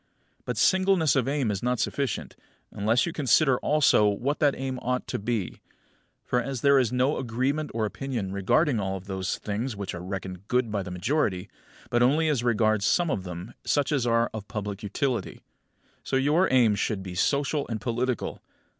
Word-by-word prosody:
But - - -3
singleness 185 -5 +3
of 135 -2 +1
aim 135 -5 0
is 100 - -3
not 125 -1 0
sufficient, 135 0 -2 0.4
unless 110 +4 +1
you 170 - -4
consider 135 -2 +3
also 145 -8 +4
what 125 +8 -1
that 145 -2 +3
aim 130 -1 -3
ought 125 +1 -1
to - - -2
be. 105 -3 -3 0.6
For, 125 - +1
as 130 -1 -4
there 140 -1 +5
is 125 -4 +1
not 130 +4 +1
agreement 135 +5 -1
of 115 - -1
opinion 110 -2 -3
regarding 115 - +2
all 95 -1 -2
those 95 -1 -3
things 110 +4 -3
which 100 -1 -5
are 85 0 -6
reckoned 95 0 -6
good 125 -3 +1
by 105 -1 -1
the 95 - -6
majority, 95 - -1 0.4
but 120 -1 +2
only 150 +6 +3
as 135 -6 0
regards 110 -3 +2
some 170 - +2
of 95 -7 -2
them 90 0 -7
such 145 +1 +1
as 135 -5 +1
are 115 0 +2
of 105 -2 -6
public 105 -2 -5
utility; 120 +5 -2 0.6
so - - -2
your 150 +7 +3
aim 120 -5 +5
should 100 -1 -2
be 95 -2 -7
social 140 - 0
and 115 -2 -3
political. 120 +2 -2
120 Hz, 180 wpm, -26 LUFS, 100-140 Hz, 0.6 s, there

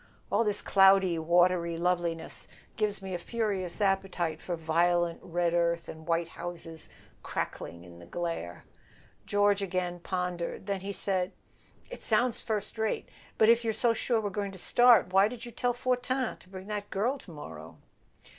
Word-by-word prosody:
All - - +3
this 210 -2 +1
cloudy 195 -3 +5
watery 170 0 +3
loveliness 170 -2 -1 0.3
gives 210 -2 -1
me 190 -1 -5
a 175 - -2
furious 200 -3 -2
appetite 190 -5 0
for 175 -2 -3
vio¬ 170 +2 +2
lent 170 -1 -4
red 170 0 0
earth 170 -1 +1
and 160 0 -9
white 165 0 +1
houses 165 -2 -5 0.3
crackling 85 0 -5
in 85 -1 -13
the 85 - -13
glare." 165 - -4 0.6
George 205 0 +3
again 180 -2 -2
pondered; 180 0 -3
then 200 -1 -1
he 200 +1 -4
said: 190 -2 0 0.6
"It - - -8
sounds 240 +2 +2
first 215 0 -3
rate. 220 -1 -1 0.3
But 220 - +5
if 235 0 +5
you're 225 -1 0
so 235 +1 +3
sure 230 +1 +1
we're 205 -2 -2
going 200 0 -3
to - - -7
start 235 -1 +5
why 195 +1 +6
did 235 +1 -7
you 240 - -8
tell 245 +2 0
Fortin 250 0 -1
to - - -18
bring 190 0 -9
that 205 -1 -4
girl 245 +8 0
to - - -15
morrow?" 80 - -10
185 Hz, 170 wpm, -29 LUFS, 170-210 Hz, 0.6 s, why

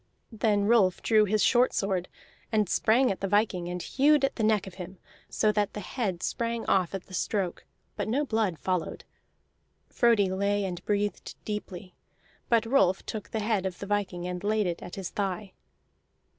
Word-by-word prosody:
Then 210 -2 +1
Rolf 205 -5 +3
drew 215 -2 +4
his 210 +1 +1
short 250 0 +4
sword, 190 -3 -1 0.4
and 215 -2 +2
sprang 240 +8 +3
in - - +2
at 190 - -4
the 195 - 0
viking, 200 -3 +1
and 180 0 -4
hewed 285 - +3
at 270 - -3
the - - -3
neck 215 -2 +2
of 190 - -9
him, 185 +2 -9 0.3
so 215 - +2
that 210 -1 0
the - - -5
head 195 -3 -3
sprang 235 0 -2
off 185 -1 +1
at 190 - -6
the 190 - -15
stroke; 185 -2 -2 0.3
but - - -3
no 275 +7 0
blood 220 - 0
followed. 180 -1 -2 0.9
Frodi 220 -6 +3
lay 200 +1 0
and 180 -1 -5
breathed 205 -2 -2
deeply, 190 -4 -6 0.6
but 230 -1 +3
Rolf 225 -7 +2
took 215 -2 -6
the 220 - -2
head 210 -3 0
of 180 -1 -6
the - - -6
viking 195 -3 -2
and 180 +1 -5
laid 215 0 +1
it 175 -2 -3
at 175 - -8
his 190 -3 -5
thigh. 195 0 -3
205 Hz, 185 wpm, -28 LUFS, 185-220 Hz, 0.9 s, drew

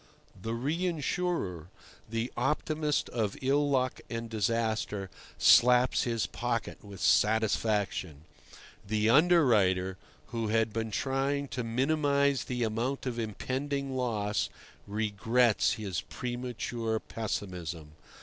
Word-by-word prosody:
The 115 +3 -3
reinsurer, 155 - -1 0.4
the 115 +2 -2
optimist 150 +1 0
of 110 -4 -2
ill 140 +2 +2
luck 130 -2 0
and 115 -1 -5
disaster, 110 -3 -1 0.3
slaps 125 +2 +5
his 115 -3 0
pocket 120 -1 -3
with 100 -2 -10
satisfaction. 105 -7 +1 0.6
The 110 +2 +1
underwriter, 110 - +4 0.3
who 115 -2 -2
had 110 0 +1
been 115 0 -2
trying 135 +5 -1
to 125 - -3
minimize 140 +3 +1
the 125 -1 -2
amount 115 +6 -2
of 120 -2 -3
impending 135 +5 -3
loss, 110 -5 -1 0.4
regrets 110 +3 +2
his 100 -6 -3
premature 120 -2 -3
pessimism. 90 -9 -5
115 Hz, 100 wpm, -30 LUFS, 105-135 Hz, 0.6 s, slaps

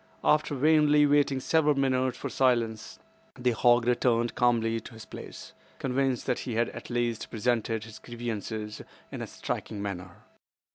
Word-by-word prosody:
After 150 -1 +2
vainly 150 +1 +5
waiting 145 -2 +3
several 150 +2 +2
minutes 130 -2 +1
for - - -4
silence 115 -4 0 0.4
the 125 0 +1
hog 120 +1 +4
returned 120 -1 +2
calmly 115 -2 +2
to 115 - -12
his 110 -1 -10
place, - - -10 0.2
convinced 130 -1 0
that 125 - 0
he 120 - -4
had 115 +1 +1
at - - -9
least 120 -2 -1
presented 115 -1 -1
his 110 -1 -11
grievances 110 -3 -5 0.3
in - - -6
a - - -4
striking 105 - -5
manner. 95 -2 -4
120 Hz, 150 wpm, -28 LUFS, 115-135 Hz, 0.4 s, vainly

